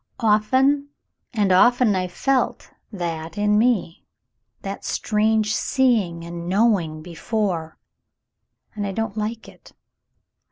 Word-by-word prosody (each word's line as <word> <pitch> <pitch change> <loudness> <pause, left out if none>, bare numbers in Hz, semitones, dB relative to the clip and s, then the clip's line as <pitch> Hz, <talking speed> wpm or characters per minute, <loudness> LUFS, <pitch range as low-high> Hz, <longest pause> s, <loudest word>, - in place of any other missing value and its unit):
"Often 260 +7 +2 0.4
and 205 -5 +1
often 240 +3 +4
I've 185 -1 -2
felt 265 +7 -1 0.2
that 165 -4 -5
in 210 0 +2
me 220 -8 0 0.3
— 115 0 -51
that 195 0 -6
strange 215 0 +1
seeing 215 -11 +1
and 170 0 -6
knowing 185 -7 +1
before, 170 -1 -3 1.0
and 205 -2 -3
I 195 - -4
don't 225 -1 -3
like 220 +1 -4
it. - - -17
210 Hz, 115 wpm, -22 LUFS, 170-225 Hz, 1.0 s, often